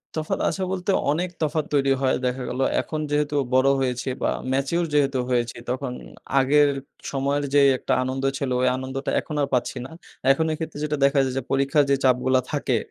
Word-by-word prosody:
তফাৎ 155 -1 -2
আছে 195 - -4
বলতে 190 +1 -1 0.2
অনেক 175 +4 -1
তফাৎ 155 0 0
তৈরি 140 -1 +3
হয়। 130 -1 +2
দেখা 125 +1 -1
গেলো, 130 +2 -1 0.2
এখন 155 - -5
যেহেতু 145 0 0 0.2
বড় 130 +1 +4
হয়েছি 125 -1 -2
বা - - +1 0.2
ম্যাচিউর 140 +6 0
যেহেতু 140 -3 +2
হয়েছি 120 -1 0
তখন 130 +1 -2 0.5
আগের 145 +2 +4 0.4
সময়ের 140 +1 0
যে 145 - +6 0.2
একটা - - -1
আনন্দ 130 +1 -3
ছিল 135 -2 -2
ওই - - +3
আনন্দটা 130 +1 -4
এখন 150 - -7
আর 140 - +1
পাচ্ছি 125 +1 0
না। - - -10 0.4
এখন 160 +4 +2
এ - - -1
ক্ষেত্রে 160 -2 -5
যেটা 150 0 -1
দেখা 140 0 +3
যায় 130 - -2
যে - - 0
পরীক্ষা 135 +2 +2
যে 140 - +5
চাপগুলা 130 0 +3
থাকে, 140 -4 0
135 Hz, 190 wpm, -24 LUFS, 130-150 Hz, 0.5 s, যে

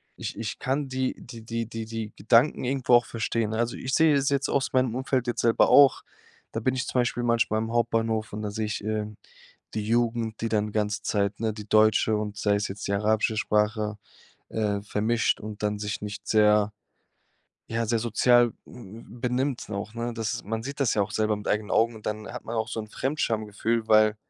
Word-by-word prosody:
Ich - - -6
ich 115 -2 -4
kann 135 +2 -1
die 130 0 -2
die 120 -2 -11
die 115 0 -3
die 115 0 -5
die 110 -1 -5
Gedanken 120 +6 +3
irgendwo 130 -1 0
auch 120 -1 +6
verstehen, 115 -1 -2
ne? 110 - -3
Also, 120 +1 -1
ich 130 +1 -4
sehe 160 -1 +5
es 140 0 +2
jetzt 140 -1 +1
aus 135 - 0
meinem 130 -3 +1
Umfeld 130 -1 -1
jetzt 120 - -1
selber 115 -1 +4
auch. 140 -2 +6 0.5
Da 115 - -2
bin 130 +3 +1
ich 130 -1 -2
zum 125 - 0
Beispiel 120 0 -1
manchmal 115 -2 +2
im 110 +1 -3
Hauptbahnhof 115 -2 0
und 105 - -5
da 105 -1 -3
sehe 110 +1 -2
ich, 105 - -3
ähm, 105 -1 -3 0.6
die 110 -1 -2
Jugend, 115 -1 0
die 115 - -1
dann 105 -1 0
ganze 105 0 -1
Zeit, 100 0 -1
ne 110 -1 +1
die 105 0 -9
deutsche 110 +1 +4
und 105 -1 -3
sei 105 0 +2
es 100 0 -1
jetzt 100 +1 -6
die 100 - -1
arabische 110 +2 +1
Sprache, 105 0 0 0.5
äh, 105 -2 -1
vermischt 110 +3 0
und 105 -1 -7
dann 105 0 0
sich 105 +1 -3
nicht 105 -1 -6
sehr 105 -1 +4 1.0
ja, 115 0 -1
sehr 115 +1 +1
sozial 120 +1 +4
m - - -14 0.3
m 120 +2 -13
benimmt 125 +1 -1
auch, 105 +2 -5
ne? 120 +1 -3
Das 110 -1 -3
man 110 +2 -3
sieht 140 +4 -7
das 135 - +2
ja 105 - +1
auch 100 +1 -5
selber 110 -1 +1
mit 105 - -7
eigenen 105 0 0
Augen 115 +2 +3
und 110 - -13
dann 105 0 -3
hat - - -7
man 115 - -5
auch 110 +1 -1
so 110 - -3
'n 110 - -9
Fremdschamgefühl, 115 -4 -1
weil 110 0 +5
110 Hz, 215 wpm, -26 LUFS, 105-120 Hz, 1.0 s, auch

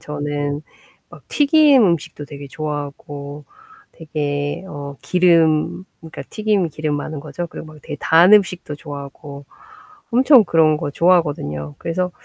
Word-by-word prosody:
저는 145 0 -4 0.5
막 - - -16
튀긴 290 -3 +5
음식도 170 -5 0
되게 140 -1 -10
좋아하고 145 0 -6 0.5
되게 145 0 -3
어 140 -4 -8
기름 170 -1 +2 0.2
그러니까 160 -3 -9
튀김이 210 -6 0
기름 150 0 -3
많은 150 0 -5
거죠. 155 +4 -6
그리고 160 - -9
뭐 155 0 -13
되게 - - -6
단 170 +5 +5
음식도 180 -7 +3
좋아하고 140 -1 -9 0.7
엄청 255 0 +6
그런 160 -3 +3
거 145 - -4
좋아하거든요. 140 - 0
그래서 180 +2 -2
155 Hz, 295 characters per minute, -19 LUFS, 145-175 Hz, 0.7 s, 엄청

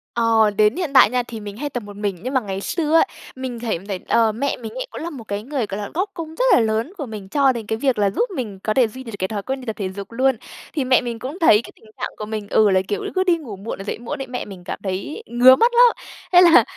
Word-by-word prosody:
Ờ, 225 -2 +4
đến 215 +1 +4
hiện 345 -6 -3
tại 260 -6 +8
nha 250 +1 0
thì 235 -2 -8
mình 205 -1 -8
hay 290 +4 -3
tập 245 -4 -5
một 205 0 -10
mình, 200 -2 -2
nhưng 255 +2 -3
mà 260 - +4
ngày 195 -3 -5
xưa 315 - 0
á, 330 - +7 0.3
mình 260 -2 -5
thấy 230 -7 -2
thấy, 195 -3 -3
ờ, 225 -1 +3
mẹ 260 +6 -2
mình 225 -2 -7
ấy - - -5
cũng - - -7
là 335 - -4
một 275 -8 -9
cái 205 -1 -4
người, 265 -1 -2
gọi 195 - -4
là, 205 - -5
góp 375 +5 -1
công 320 -2 -7
rất - - +1
là - - +6
lớn 225 - 0
của 290 - -4
mình 210 -5 -8
cho 275 +4 +3
đến 235 -3 -5
cái 220 - -1
việc 260 +1 +1
là 205 -1 +3
giúp 205 - 0
mình 215 - -5
có 215 - 0
thể 250 -1 +4
duy 260 +4 -10
đ - - -16
được - - -6
cái 190 - 0
thói 205 0 -4
quen 265 +3 -3
đi - - -10
tập 220 -2 -3
thể 195 -2 -2
dục 200 +2 -8
luôn. 260 +2 +2 0.4
Thì 295 - 0
mẹ 255 -1 +4
mình 235 -2 -5
cũng 275 +9 -6
thấy 225 - +6
cái - - -11
tình - - -22 0.2
trạng - - -1
của 215 - -5
mình 215 -1 -5
ừ, 215 -1 +4
là 190 -1 +3
kiểu 205 - -2
cứ 375 - +3
đi 355 -2 +3
ngủ 255 -11 -8
muộn 200 +4 -6
là 195 - -7
dậy 205 - -4
muộn 240 +3 -5
ấy, 270 - -5
mẹ 250 0 -4
mình 190 -3 -11
cảm - - -5
thấy 195 - -4
ngứa 250 - +7
mắt 470 - +3
lắm. 485 0 +7 0.4
Thế 355 - +9
là 350 -1 +7
235 Hz, 310 wpm, -21 LUFS, 210-275 Hz, 0.4 s, Thế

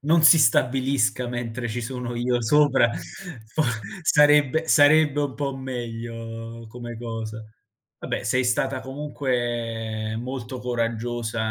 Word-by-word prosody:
non 160 +3 +3
si 160 +1 +8
stabilisca 130 0 +2
mentre 120 0 -4
ci 120 +2 -3
sono 120 0 -5
io 120 0 0
sopra, 135 -1 +4 0.6
fo 155 +8 -1 0.4
sarebbe 150 +1 +4
sarebbe 150 -1 +5
un 140 -2 -3
po' 140 -2 -3
meglio 115 -2 -6
come 120 0 -8
cosa. 110 -2 -6 0.5
Vabbè, - - -4
sei 130 0 +1
stata 130 +2 0
comunque 120 -6 -3
molto 125 0 -5
coraggiosa, 115 -2 -2
120 Hz, 115 wpm, -24 LUFS, 115-135 Hz, 0.6 s, si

